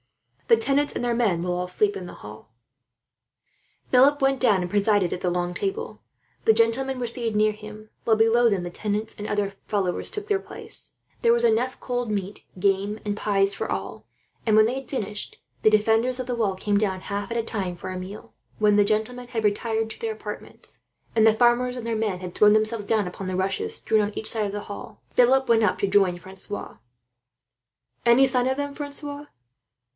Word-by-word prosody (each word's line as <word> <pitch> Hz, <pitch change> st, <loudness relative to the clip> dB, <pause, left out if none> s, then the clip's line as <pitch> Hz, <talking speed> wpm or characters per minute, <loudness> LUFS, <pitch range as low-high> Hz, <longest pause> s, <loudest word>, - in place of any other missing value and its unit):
The 230 Hz, -, +6 dB
tenants 275 Hz, +5 st, +1 dB
and -, -, -3 dB
their 240 Hz, -, +1 dB
men 205 Hz, -8 st, +1 dB
will 180 Hz, 0 st, -1 dB
all 180 Hz, 0 st, -2 dB
sleep 205 Hz, +3 st, +1 dB
in 180 Hz, -2 st, -6 dB
the -, -, -10 dB
hall." 105 Hz, +1 st, -12 dB, 1.4 s
Philip 275 Hz, +3 st, +5 dB
went 270 Hz, 0 st, +2 dB
down, 210 Hz, -7 st, +4 dB
and 180 Hz, -, -3 dB
presided 205 Hz, -2 st, +2 dB
at 180 Hz, -, -5 dB
the 180 Hz, -, 0 dB
long 175 Hz, 0 st, -1 dB
table. 450 Hz, -, -4 dB, 0.4 s
The -, -, +6 dB
gentlemen 230 Hz, +4 st, +1 dB
were 245 Hz, -, -2 dB
seated 230 Hz, -2 st, -1 dB
near 215 Hz, 0 st, +4 dB
him 215 Hz, 0 st, -11 dB
while, 225 Hz, -, +3 dB
below 230 Hz, +2 st, +4 dB
them, 195 Hz, -4 st, 0 dB
the 175 Hz, -, -4 dB
tenants 210 Hz, +3 st, -3 dB
and 210 Hz, -, -5 dB
other 205 Hz, -1 st, -1 dB
followers 190 Hz, -4 st, -1 dB
took 420 Hz, -1 st, -6 dB
their 410 Hz, -2 st, +1 dB
places. -, -, -7 dB, 0.2 s
There 465 Hz, -, +4 dB
was 475 Hz, 0 st, +3 dB
enough 440 Hz, -, +1 dB
cold 245 Hz, -2 st, -3 dB
meat, 200 Hz, -1 st, -4 dB, 0.2 s
game, 200 Hz, +2 st, +1 dB
and 205 Hz, -1 st, -1 dB
pies 200 Hz, -1 st, +1 dB
for -, -, -4 dB
all; -, -, -5 dB, 0.4 s
and 215 Hz, -2 st, +4 dB
when 215 Hz, -, +7 dB
they 235 Hz, -, 0 dB
had 270 Hz, 0 st, -6 dB
finished, 210 Hz, -5 st, -4 dB, 0.2 s
the -, -, +5 dB
defenders 225 Hz, +4 st, +2 dB
of 255 Hz, -, -3 dB
the 250 Hz, -, -1 dB
wall 210 Hz, -5 st, 0 dB
came 205 Hz, +2 st, 0 dB
down, 190 Hz, -3 st, -1 dB
half 200 Hz, +2 st, -4 dB
at 235 Hz, -, -1 dB
a 230 Hz, -, 0 dB
time, 190 Hz, -6 st, -4 dB
for 185 Hz, +2 st, -6 dB
a 185 Hz, -, -4 dB
meal. 190 Hz, +3 st, -9 dB, 0.2 s
When 210 Hz, -1 st, +3 dB
the 205 Hz, -, +6 dB
gentlemen 220 Hz, +4 st, -1 dB
had 225 Hz, -3 st, -2 dB
retired 220 Hz, +2 st, 0 dB
to -, -, -9 dB
their 455 Hz, -1 st, -1 dB
apartments, -, -, -9 dB, 0.4 s
and 220 Hz, -1 st, +5 dB
the 220 Hz, -, +6 dB
farmers 245 Hz, +2 st, +2 dB
and 240 Hz, -, -6 dB
their 230 Hz, -, -1 dB
men 215 Hz, -4 st, -1 dB
had 180 Hz, -1 st, -7 dB
thrown 210 Hz, +2 st, +5 dB
themselves 215 Hz, 0 st, +1 dB
down 210 Hz, -2 st, +1 dB
upon 185 Hz, +1 st, -6 dB
the 185 Hz, 0 st, -2 dB
rushes 190 Hz, +1 st, -1 dB
strewn 220 Hz, -1 st, +2 dB
on 205 Hz, 0 st, -3 dB
each 220 Hz, -, +1 dB
side 215 Hz, -2 st, +2 dB
of -, -, -5 dB
the 205 Hz, +1 st, -4 dB
hall, 205 Hz, -, -9 dB
Philip 265 Hz, +2 st, +4 dB
went 225 Hz, -1 st, +4 dB
up 205 Hz, -, +2 dB
to 200 Hz, -, 0 dB
join 190 Hz, -3 st, +3 dB
Francois. 190 Hz, -, -6 dB, 1.3 s
"Any 240 Hz, +3 st, +6 dB
sign 255 Hz, -1 st, +1 dB
of 265 Hz, +1 st, 0 dB
them, 285 Hz, 0 st, -3 dB
Francois?" 290 Hz, 0 st, -4 dB
215 Hz, 210 wpm, -24 LUFS, 200-245 Hz, 1.4 s, when